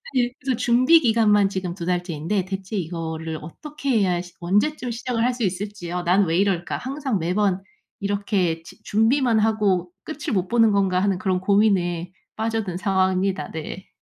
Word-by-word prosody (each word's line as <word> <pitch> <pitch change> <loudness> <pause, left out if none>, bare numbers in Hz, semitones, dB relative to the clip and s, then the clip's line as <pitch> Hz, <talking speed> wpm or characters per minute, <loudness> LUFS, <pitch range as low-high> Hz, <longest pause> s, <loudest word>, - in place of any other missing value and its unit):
예 245 -1 +2
그래서 260 -2 -1
준비기간만 235 -5 +4
지금 185 -3 -3
2 170 -3 -6
달째인데 180 +1 -1
대체 195 +2 -5
이거를 160 -2 -4
어떻게 280 - -7
해야 180 -3 +1
시 175 -1 -13
언제쯤 225 - 0
시작을 235 0 -2
할 250 - +2
수 245 -2 -4
있을지요. 180 -2 -3
'난 185 +3 +3
왜 165 0 0
이럴까. 190 -3 0
항상 265 -5 -2
매번 185 +3 +1 0.4
이렇게 200 -5 -1
주 - - -15
준비만 230 +2 +2
하고 205 -5 +1
끝을 310 -5 -5
못 185 -2 0
보는 225 0 +4
건가.' 190 -2 +2
하는 195 -2 +1
그런 185 -1 0
고민에 185 -4 +2 0.2
빠져든 220 -5 -2
상황입니다. 190 -1 0
네. 160 +4 -7
195 Hz, 340 characters per minute, -23 LUFS, 180-225 Hz, 0.4 s, 준비기간만